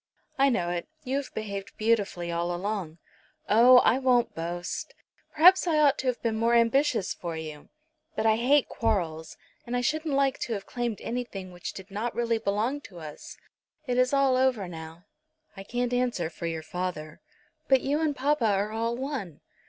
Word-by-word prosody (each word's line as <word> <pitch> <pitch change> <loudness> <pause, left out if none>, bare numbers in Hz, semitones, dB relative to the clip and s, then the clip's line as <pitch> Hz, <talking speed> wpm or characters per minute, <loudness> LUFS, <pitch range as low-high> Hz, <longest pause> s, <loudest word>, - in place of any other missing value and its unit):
"I 275 0 +5
know 175 -8 0
it. 175 -1 -3 0.2
You 265 0 -1
have 280 - -4
behaved 200 -2 -5
beautifully 205 -6 0
all 170 +1 -1
along." 185 -4 -4 0.5
"Oh; 240 +4 +7
I 255 - +4
won't 250 -2 +2
boast. 175 +2 -5 0.4
Perhaps 360 +4 +6
I 320 -2 +2
ought 290 -3 +4
to 260 - -3
have 250 -1 0
been 225 -2 0
more 230 +1 +3
ambitious 235 -2 +2
for 170 -2 -6
you. 155 -2 -8 0.5
But 220 - -1
I 220 0 +4
hate 270 +4 +3
quarrels, 170 -8 -2 0.3
and 245 +1 -3
I - - 0
shouldn't 310 +3 -1
like 275 -1 +2
to 235 - -3
have 200 -2 -5
claimed 240 -3 -3
anything 220 -6 -5
which 175 -1 -7
did 190 +1 -11
not 220 +4 -3
really 235 -1 0
belong 220 +8 -1
to 180 - -12
us. 155 -2 -10 0.5
It 250 -2 0
is 255 0 +3
all 275 -2 +3
over 255 -7 +1
now." 165 +1 -10 0.5
"I 195 - -8
can't 245 +3 -2
answer 245 -10 0
for 170 - -5
your 165 -1 -4
father." 170 -3 -5 0.5
"But 265 -2 +4
you 285 +3 0
and 305 -3 0
papa 275 -2 +1
are 205 +1 +1
all 230 +2 -1
one." 255 - -5
225 Hz, 185 wpm, -27 LUFS, 180-255 Hz, 0.5 s, Oh